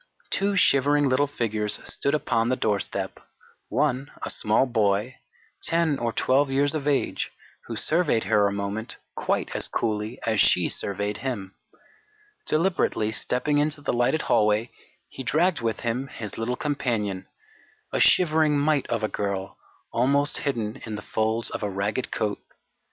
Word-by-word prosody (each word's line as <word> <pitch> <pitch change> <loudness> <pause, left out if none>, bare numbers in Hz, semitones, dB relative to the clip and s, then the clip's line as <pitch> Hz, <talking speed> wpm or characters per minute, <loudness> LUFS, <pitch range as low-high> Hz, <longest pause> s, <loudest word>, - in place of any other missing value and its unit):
Two 200 +1 +1
shivering 145 -4 +4
little 135 +2 +2
figures 110 -6 -1
stood 140 +2 +2
upon 115 -5 0
the 130 - +2
doorstep, 105 -5 -2 0.5
one 135 +2 0
a - - +2
small 110 +5 +2
boy, 110 0 0 0.5
10 165 -4 +1
or 120 -1 -1
12 135 +4 +2
years 140 +2 +2
of 150 -2 -3
age, 145 -2 0 0.4
who - - -5
surveyed 155 -9 +2
her 105 -1 +3
a - - -1
moment 100 +3 -4 0.2
quite - - -1
as - - +5
coolly 110 +2 -2
as 110 -3 +2
she - - +4
surveyed 100 +1 -2
him. 105 -8 -4 0.9
Deliberately 155 - +1
stepping 135 +6 +1
into 150 0 0
the 145 - -2
lighted 120 +6 +1
hallway, 105 +2 +2 0.4
he - - -9
dragged 165 +6 +1
with 115 -2 -2
him 120 +3 -2
his 110 -6 -7
little 115 +2 -2
companion, 115 -10 -2 0.7
a - - +1
shivering 155 -4 +4
mite 145 -1 +1
of 115 -2 -2
a - - +2
girl, 100 -2 -4 0.3
almost 140 +4 +2
hidden 115 -7 -3
in 110 -2 -5
the 105 - -7
folds 110 +1 0
of - - -4
a 105 - -1
ragged 100 +5 -2
coat. 105 -1 -2
120 Hz, 150 wpm, -25 LUFS, 105-145 Hz, 0.9 s, as